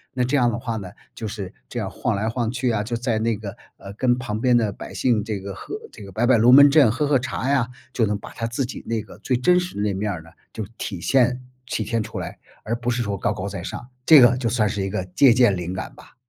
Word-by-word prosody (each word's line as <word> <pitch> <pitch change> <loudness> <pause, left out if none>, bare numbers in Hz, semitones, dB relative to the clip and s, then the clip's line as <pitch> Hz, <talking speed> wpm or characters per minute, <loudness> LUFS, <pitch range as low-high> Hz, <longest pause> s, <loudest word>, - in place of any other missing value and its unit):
那 125 - +1
这 130 +4 0
样 120 -3 +3
的 115 - -3
话 115 -1 -3
呢， 95 -4 -6 0.3
就 110 -2 -5
是 100 -2 -6 0.2
这 120 - -4
样 95 -3 -3
晃 125 - -2
来 105 +2 -1
晃 115 0 -1
去 125 0 -1
啊， 110 -3 0
就 120 +2 -3
在 115 -2 -1
那 115 -1 0
个， 105 -2 -7 0.2
呃， 100 0 -10
跟 125 +2 +1
旁 110 -4 -4
边 125 -1 +4
的 110 -3 +1
百 - - -9
姓 115 -5 +1
这 105 -3 -3
个 100 0 -7
喝 - - -7 0.2
这 - - -11
个 95 - -10
摆 120 +6 0
摆 130 -3 +5
龙 120 +3 +6
门 145 +1 +9
阵、 140 -6 +5
喝 140 +5 0
喝 140 -2 +4
茶 130 +1 -3
呀， 130 -4 +2 0.2
就 115 - +2
能 105 0 -1
把 - - -10
他 115 - -4
自 120 +3 -2
己 - - -8
那 115 -1 -1
个 - - -14
最 125 -2 0
真 180 +8 +4
实 180 - -6
的 - - -1
那 105 -1 0
面 100 +2 -2
儿 85 -4 -5
呢， 80 - -15 0.2
就 110 - -5
体 95 -5 -5
现 125 -1 +2 0.2
体 115 -2 -2
现 115 0 -1
出 110 -2 -6
来， 90 - -6 0.3
而 115 +2 -2
不 120 +1 -2
是 120 0 -1
说 100 -3 -2
高 105 - 0
高 100 -1 -5
在 100 -3 -6
上。 120 - -6 0.2
这 155 -2 +9
个 120 0 +6
就 120 -3 -1
算 110 -3 +1
是 100 0 -2
一 95 - -2
个 95 - -3
借 130 -4 +7
鉴 120 -6 +4
灵 90 0 -4
感 95 - -6
吧。 - - -17
115 Hz, 305 characters per minute, -23 LUFS, 105-125 Hz, 0.3 s, 门